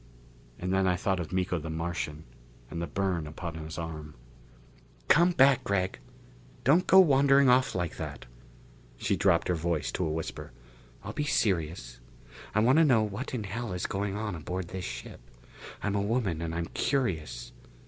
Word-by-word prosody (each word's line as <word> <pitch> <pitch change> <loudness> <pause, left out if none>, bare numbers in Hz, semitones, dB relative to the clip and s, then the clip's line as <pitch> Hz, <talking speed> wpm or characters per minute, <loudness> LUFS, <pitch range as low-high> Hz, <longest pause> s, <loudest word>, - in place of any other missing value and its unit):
And 90 +1 -2
then 95 0 +2
I 90 - +3
thought 95 +1 0
of 80 -3 -5
Miko 90 -1 0
the 80 +1 -6
Martian, 80 -2 -3 0.5
and 85 - -4
the 85 - -2
burn 90 -2 -1
upon 80 +2 -6
his 80 +1 -7
arm. 80 -3 -6 0.9
"Come 170 +3 +6
back, 135 -5 +5
Gregg! 95 -1 -1 0.6
Don't 160 +8 +4
go 190 - +8
wandering 140 -4 +5
off 130 +1 +3
like 90 -2 -2
that!" - - -6 0.7
She - - 0
dropped 90 -4 +2
her 90 - +2
voice 85 -2 -1
to 95 - -2
a 80 - 0
whisper. 80 +1 -5 0.5
"I'll - - -6
be 150 - -1
serious. 80 - -1 0.6
I 110 - +4
want 130 +7 +5
to - - +7
know 125 -8 +4
what 110 +6 -4
in 115 - -3
hell 105 +1 -4
is 90 - -3
going 100 0 -2
on 105 -2 -3
aboard 90 +2 -5
this 95 -1 -5
ship. - - -7 0.6
I'm 105 - 0
a 100 - +1
woman 100 -6 0
and 80 0 -3
I'm 85 0 -1
curious. 80 - -1
95 Hz, 175 wpm, -29 LUFS, 80-115 Hz, 0.9 s, go